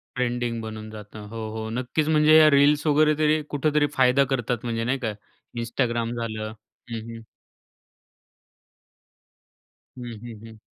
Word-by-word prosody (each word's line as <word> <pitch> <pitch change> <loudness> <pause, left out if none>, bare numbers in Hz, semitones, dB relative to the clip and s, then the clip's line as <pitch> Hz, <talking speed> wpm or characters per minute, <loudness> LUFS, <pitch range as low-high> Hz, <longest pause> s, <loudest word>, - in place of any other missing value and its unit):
Trending 120 -2 -1
बनून 110 -1 -7
जातं 105 0 -10
हो, 110 -1 -5
हो, 110 0 -4
नक्कीच. 125 +6 -1
म्हणजे 155 0 +6
या 155 -1 +8
रील्स 145 +2 +4
वगैरे 155 +1 +4
तरी 155 0 +3
कुठेतरी 150 +1 +1
फायदा 130 +1 +4
करतात. 120 -1 -1
म्हणजे 115 -1 -2
नाही 130 +3 0
का, 110 -4 -2 0.5
Instagram 120 0 -1
झालं 110 -1 -4 0.4
हं, 115 - -3
हं. 115 0 -9 2.7
हं, 120 -1 -6
हं, 115 -3 -9
हं. 110 -1 -12
120 Hz, 135 wpm, -24 LUFS, 115-145 Hz, 2.7 s, या